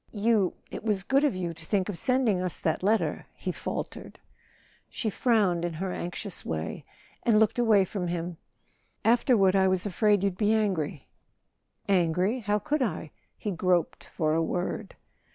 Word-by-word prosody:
"You—it 210 -4 0
was 210 -3 0
good 275 +5 +2
of 285 -9 +2
you 175 -2 -3
to 165 0 -11
think 190 +2 0
of 205 - -3
sending 230 -1 +1
us 180 -2 -2
that 160 - -1
letter," 215 +4 0
he - - -3
faltered. - - -6 0.7
She 220 - -2
frowned 200 -8 +2
in 175 -1 -2
her 185 +4 -3
anxious 180 +2 -4
way 80 0 -4 0.4
and 220 -3 +4
looked 220 +2 +2
away 215 -5 +5
from 180 -1 -4
him. 170 0 -3 0.7
"Afterward 225 -5 +4
I 190 -1 +4
was 185 0 +1
afraid 205 0 +2
you'd 195 -2 -1
be 215 0 +3
angry." 175 -10 -1 0.8
"Angry? 185 +5 +2
How 210 -2 0
could 290 +8 -1
I?" 160 -9 -2 0.3
He 210 - -3
groped 180 -2 0
for 155 -2 -1
a 165 - +2
word. 180 +5 -3
195 Hz, 160 wpm, -28 LUFS, 175-220 Hz, 0.8 s, away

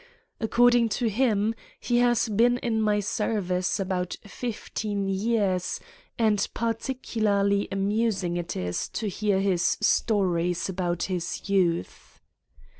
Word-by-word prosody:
According 240 +1 +4
to 245 - 0
him, 215 -1 +1 0.3
he 240 -1 +1
has 240 -1 +3
been 235 +3 +3
in 225 -3 -1
my 210 -1 +2
service 195 -3 -1
about 185 -2 -2
fifteen 205 -2 -4
years 195 -2 0 0.4
and 215 -3 +2
particularly 215 -4 0
amus 205 +1 0
ing 175 -1 -1
it 175 -1 -3
is 90 -1 -2
to 220 - -2
hear 205 0 0
his 185 -3 +1
stories 180 -5 +1
of 175 -2 -1
his 180 -1 -3
youth. 180 -4 -1
205 Hz, 115 wpm, -26 LUFS, 185-225 Hz, 0.4 s, According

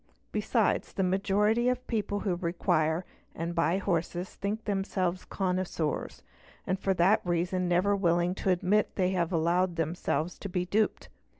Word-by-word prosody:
Besides, - - 0
the 190 - 0
majority 205 +5 +2
of 250 0 -2
people 205 -3 -2
who 195 - 0
require 170 -1 0 0.3
and 170 +1 -3
buy 165 +2 +2
horses 175 -1 -2
think 210 +3 -3
themselves 190 -3 -1
connoisseurs 180 -5 -2 0.4
and 185 +1 -1
for 195 -1 +1
that 190 +6 +4
reason 180 +1 0
never 180 +4 +3
willingly 175 -1 +1
admit 190 +4 +2
that - - -35
they 185 -1 +1
have 175 -2 0
allowed 175 +2 +1
themselves 165 0 -1
to 200 - -6
be 180 0 -1
duped. 210 +4 0
185 Hz, 145 wpm, -29 LUFS, 175-200 Hz, 0.4 s, that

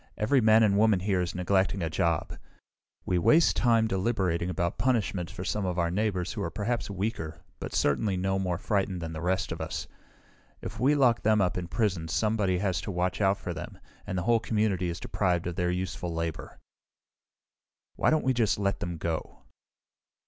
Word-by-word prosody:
Every 125 +5 +3
man 110 0 +6
and 100 -2 +3
woman 105 -4 +4
here 95 -2 +1
is 90 0 -3
neglecting 95 +1 +1
a 80 - -1
job. 85 -1 0 0.7
We 90 - +1
waste 155 - +4
time, 115 -2 +3
deliberating 95 -4 0
about 85 +1 -2
punishment 105 -8 0
for 90 - -7
some 105 +2 -1
of 90 -1 -2
our 85 -1 +1
neighbors 95 -2 -1
who 105 - -4
are - - -2
perhaps 115 +3 -2
weaker, 95 -5 -4 0.2
but - - -6
certainly 95 +7 +1
no 95 +1 0
more 90 -2 -1
frightened 95 -1 -1
than 80 -1 -5
the 80 - -5
rest 95 +1 0
of - - -4
us. - - -4 0.7
If 110 +5 -7
we 135 +5 +3
lock 125 -5 +3
them 110 0 +3
up 90 -3 +1
in 90 -1 -3
prison 90 -4 -1
somebody 105 +1 +1
has 90 -4 -1
to 85 - -5
watch 90 -2 -1
out 100 0 +3
for - - -5
them, - - -8 0.3
and 95 -2 -3
the 90 - -1
whole 115 +2 +3
community 105 -5 0
is 85 - -4
deprived 90 -4 0
of 90 -1 -3
their 90 0 0
useful 90 -1 -3
labor. 85 -1 -4 1.4
"Why - - +2
don't 155 -2 +1
we 130 - +3
just 115 -4 +1
let 100 -1 -1
them 85 -1 -4
go?" 80 0 -4
95 Hz, 190 wpm, -28 LUFS, 90-110 Hz, 1.4 s, man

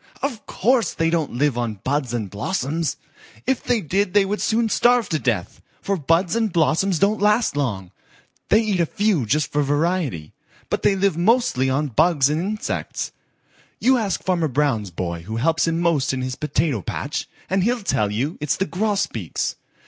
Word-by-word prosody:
"Of 250 -7 -3
course 235 0 +1
they 165 0 +1
don't 165 -3 0
live 135 -1 +1
on 115 -3 -2
buds 140 -2 -1
and 115 -4 -2
blossoms. 140 - -2 0.5
If 265 0 +1
they 245 -3 +1
did 190 +3 -1
they 205 -1 +5
would 205 +2 -2
soon 225 0 +1
starve 240 0 +3
to 155 - 0
death, 115 -11 -2 0.2
for 200 - -1
buds 165 +3 +1
and 225 -3 +1
blossoms 170 +3 +2
don't 200 +4 +2
last 210 -2 +3
long. 100 -11 -2 0.6
They 215 - +5
eat 210 -5 0
a 170 - +2
few 200 - +1
just 150 +7 +1
for 150 - +1
variety, 145 - -1 0.4
but - - 0
they 200 - +3
live 195 -3 +1
mostly 175 - +2
on 145 +3 0
bugs 145 +1 +3
and 155 +2 0
insects. 210 +3 -3 0.7
You 260 +1 +4
ask 200 -5 -2
Farmer 175 -4 +1
Brown's 130 -7 0
boy 85 -1 -4
who 110 +6 -6
helps 160 +8 +1
him 165 0 0
most 155 -7 +1
in 130 -1 -2
his 130 0 -3
potato 150 -5 -1
patch, - - -4 0.2
and 190 0 +1
he'll 240 +1 0
tell 120 - +1
you 130 - -2
it's 150 - 0
the 190 - 0
Grosbeaks. 195 - -2
165 Hz, 180 wpm, -22 LUFS, 130-200 Hz, 0.7 s, they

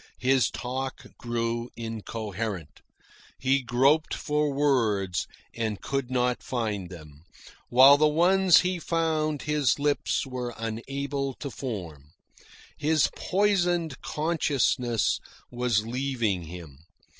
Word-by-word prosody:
His 130 -1 +3
talk 130 +1 -5
grew 120 0 -2
incoherent. 110 -7 -5 0.6
He 135 +1 +2
groped 135 +6 +2
for 150 -1 0
words 115 -10 +1 0.3
and 110 -3 -3
could 135 -2 -3
not 125 -1 0
find 105 -7 -3
them, 75 -4 -12 0.5
while 135 +3 +8
the 155 +1 +4
ones 180 +4 +5
he 180 -1 -1
found 160 -3 -1
his 150 -4 +1
lips 145 0 0
were 125 -2 -5
unable 135 +4 -3
to 140 - -6
form. 85 - -7 0.6
His 155 -1 +2
poisoned 175 -6 +1
consciousness 140 -7 0 0.3
was 120 -3 0
leaving 120 -7 -1
him. 80 -5 -10
125 Hz, 105 wpm, -27 LUFS, 110-150 Hz, 0.6 s, while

